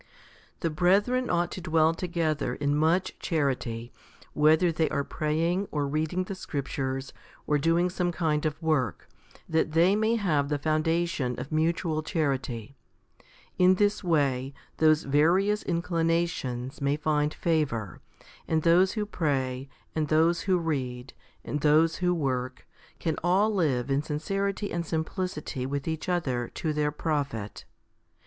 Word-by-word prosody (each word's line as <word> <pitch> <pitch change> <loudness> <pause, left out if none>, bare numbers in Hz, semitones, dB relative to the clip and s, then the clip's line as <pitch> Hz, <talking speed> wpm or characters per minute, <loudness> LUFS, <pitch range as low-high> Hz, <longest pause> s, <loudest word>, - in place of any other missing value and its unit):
1. - - -30 0.5
THE 165 - +1
brethren 205 +10 +2
ought 175 0 +1
to 185 - -6
dwell 160 -1 +3
together 165 -3 -1
in 145 0 0
much 165 +5 +1
charity, 125 -7 -2 0.4
whether 160 +4 +4
they 160 -1 0
are 140 -2 -1
praying, 165 +7 -1
or 145 -2 -1
reading 155 +5 -1
the 190 - -6
scriptures, 135 -5 -4 0.3
or 150 -1 +2
doing 165 +4 +2
some 180 0 -1
kind 155 -3 0
of 150 - -5
work, 140 - 0 0.4
that 160 -1 0
they 175 +5 +4
may 220 +2 +2
have 155 -10 +1
the 145 - 0
foundation 155 -4 0
of 130 +4 -7
mutual 160 0 0
charity. 135 -6 -2 0.8
In 185 +1 +6
this 205 +2 +1
way, 140 -5 +1 0.2
those 155 -1 +4
various 180 +9 +3
inclinations 165 -7 -1
may 140 +1 +1
find 150 -1 +1
favour, 135 - -1 0.5
and 160 -1 +1
those 180 +3 +4
who 215 -2 -1
pray, 135 -8 -2 0.2
and 155 -1 -1
those 165 +3 +3
who 185 - +4
read, 130 -6 -3 0.3
and 150 - -3
those 155 +2 +4
who 180 -1 +1
work, 130 -4 -2 0.3
can 160 -2 -2
all 195 +5 +3
live 140 -9 0
in 135 +1 +2
sincerity 195 +7 -2
and 170 0 -1
simplicity 160 -4 -3
with 140 +1 -3
each 160 +2 -3
other 130 -9 0
to 155 -2 -1
their 150 0 0
profit. 140 -9 -3
155 Hz, 140 wpm, -27 LUFS, 140-175 Hz, 0.8 s, In